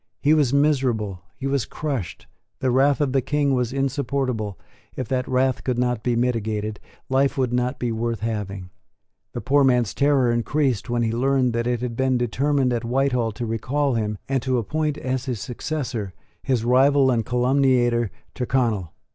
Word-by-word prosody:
He 150 Hz, +1 st, +3 dB
was 145 Hz, -5 st, +3 dB
miserable; 130 Hz, -, +1 dB, 0.2 s
he 135 Hz, -, -6 dB
was 135 Hz, -4 st, 0 dB
crushed; 135 Hz, -, -4 dB, 0.3 s
the 130 Hz, -1 st, 0 dB
wrath 140 Hz, +3 st, +3 dB
of 140 Hz, -3 st, +1 dB
the 135 Hz, -, +3 dB
King 145 Hz, +1 st, +1 dB
was 125 Hz, -2 st, 0 dB
insupportable; 130 Hz, -, -1 dB, 0.4 s
if 130 Hz, -, -4 dB
that 130 Hz, -1 st, -1 dB
wrath 130 Hz, 0 st, +1 dB
could 125 Hz, -2 st, -1 dB
not 125 Hz, -2 st, 0 dB
be 120 Hz, +1 st, 0 dB
mitigated, 110 Hz, -3 st, -1 dB, 0.3 s
life 135 Hz, +2 st, +1 dB
would 125 Hz, -2 st, 0 dB
not 125 Hz, +1 st, 0 dB
be 120 Hz, -1 st, -2 dB
worth 115 Hz, -1 st, -2 dB
having. 100 Hz, -5 st, -4 dB, 0.6 s
The -, -, -4 dB
poor 140 Hz, +2 st, +3 dB
man's 125 Hz, -5 st, +2 dB
terror 140 Hz, -4 st, +3 dB
increased 120 Hz, 0 st, 0 dB
when 120 Hz, 0 st, +1 dB
he 115 Hz, -, 0 dB
learned 130 Hz, +1 st, +1 dB
that 115 Hz, +1 st, -1 dB
it 120 Hz, -1 st, 0 dB
had 125 Hz, -2 st, -3 dB
been 130 Hz, 0 st, +1 dB
determined 130 Hz, +2 st, +1 dB
at 120 Hz, -1 st, -2 dB
Whitehall 125 Hz, -1 st, +1 dB
to 120 Hz, -, -4 dB
recall 130 Hz, +5 st, -1 dB
him, 105 Hz, -2 st, -1 dB
and 135 Hz, -2 st, 0 dB
to 130 Hz, 0 st, 0 dB
appoint, 150 Hz, +6 st, -1 dB
as 130 Hz, -2 st, -2 dB
his 125 Hz, -5 st, -3 dB
successor, 125 Hz, -, -4 dB, 0.3 s
his 120 Hz, -4 st, 0 dB
rival 135 Hz, +2 st, +4 dB
and 115 Hz, -2 st, +1 dB
calumniator, 125 Hz, -1 st, +2 dB, 0.2 s
Tyrconnel. 115 Hz, -, 0 dB
125 Hz, 170 wpm, -23 LUFS, 115-135 Hz, 0.6 s, rival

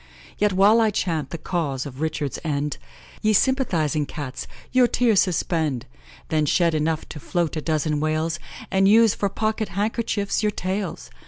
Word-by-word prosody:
Yet 210 Hz, 0 st, +3 dB
while 205 Hz, +5 st, +5 dB
I 220 Hz, -, +4 dB
chant 165 Hz, -8 st, -1 dB
the 170 Hz, -, -5 dB
cause 150 Hz, -6 st, -2 dB
of 140 Hz, 0 st, -8 dB
Richard's 150 Hz, -3 st, -2 dB
end, 145 Hz, -2 st, -2 dB, 0.4 s
Ye 215 Hz, 0 st, +3 dB
sympathising 170 Hz, -, +1 dB
Cats, 145 Hz, -4 st, -6 dB, 0.2 s
your 255 Hz, -1 st, +5 dB
tears 235 Hz, -5 st, +3 dB
suspend! 160 Hz, -, 0 dB, 0.4 s
Then 155 Hz, -1 st, +1 dB
shed 170 Hz, +2 st, +3 dB
enough 155 Hz, +1 st, -1 dB
to 150 Hz, -, -7 dB
float 170 Hz, +2 st, -1 dB
a 155 Hz, -, -2 dB
dozen 155 Hz, -1 st, 0 dB
whales, 155 Hz, +2 st, -1 dB, 0.3 s
And 195 Hz, 0 st, +4 dB
use 220 Hz, 0 st, +6 dB
for 200 Hz, -, -1 dB
pocket 215 Hz, +1 st, -1 dB
handkerchiefs 205 Hz, +1 st, -1 dB
your 210 Hz, -1 st, +1 dB
tails! 190 Hz, 0 st, -4 dB
170 Hz, 160 wpm, -23 LUFS, 155-210 Hz, 0.4 s, use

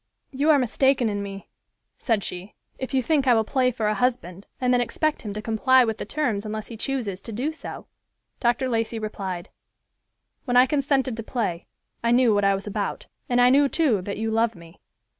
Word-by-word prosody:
"You 285 Hz, +3 st, 0 dB
are 305 Hz, -, +7 dB
mistaken 260 Hz, -1 st, +2 dB
in 205 Hz, -1 st, -2 dB
me," 195 Hz, -1 st, -7 dB, 0.5 s
said 225 Hz, -5 st, 0 dB
she, 180 Hz, +3 st, -6 dB, 0.2 s
"if 260 Hz, -, -5 dB
you 260 Hz, -1 st, +1 dB
think 285 Hz, -1 st, +1 dB
I 245 Hz, -, +6 dB
will 220 Hz, -, +3 dB
play 255 Hz, +3 st, +1 dB
for 230 Hz, -3 st, -3 dB
a 210 Hz, -, +2 dB
husband, 205 Hz, -7 st, -2 dB
and 250 Hz, -1 st, +2 dB
then 245 Hz, -, +3 dB
expect 300 Hz, +6 st, -1 dB
him 210 Hz, -, -5 dB
to 215 Hz, -, -5 dB
comply 250 Hz, +3 st, +4 dB
with 220 Hz, -1 st, -3 dB
the -, -, -4 dB
terms 240 Hz, -10 st, -1 dB
unless 215 Hz, 0 st, -5 dB
he 230 Hz, -, -7 dB
chooses 220 Hz, -6 st, -3 dB
to 230 Hz, -, -8 dB
do 255 Hz, +8 st, -2 dB
so." 320 Hz, -, -8 dB, 0.5 s
Dr. 240 Hz, +2 st, +1 dB
Lacey 230 Hz, -1 st, -1 dB
replied, 195 Hz, -4 st, -5 dB, 1.0 s
"When 245 Hz, -2 st, +2 dB
I 250 Hz, -, +8 dB
consented 270 Hz, -2 st, 0 dB
to -, -, -3 dB
play, 215 Hz, -7 st, -3 dB, 0.4 s
I 235 Hz, -, +2 dB
knew 240 Hz, -1 st, +4 dB
what 205 Hz, 0 st, +2 dB
I 195 Hz, 0 st, +4 dB
was 195 Hz, -, -6 dB
about, 205 Hz, -1 st, -3 dB, 0.2 s
and 245 Hz, 0 st, +2 dB
I 245 Hz, 0 st, +6 dB
knew, 280 Hz, +1 st, +4 dB
too, 265 Hz, -, +2 dB
that 200 Hz, +2 st, -5 dB
you 220 Hz, +1 st, -2 dB
love 225 Hz, 0 st, +1 dB
me. 170 Hz, +1 st, -15 dB
230 Hz, 210 wpm, -24 LUFS, 210-260 Hz, 1.0 s, I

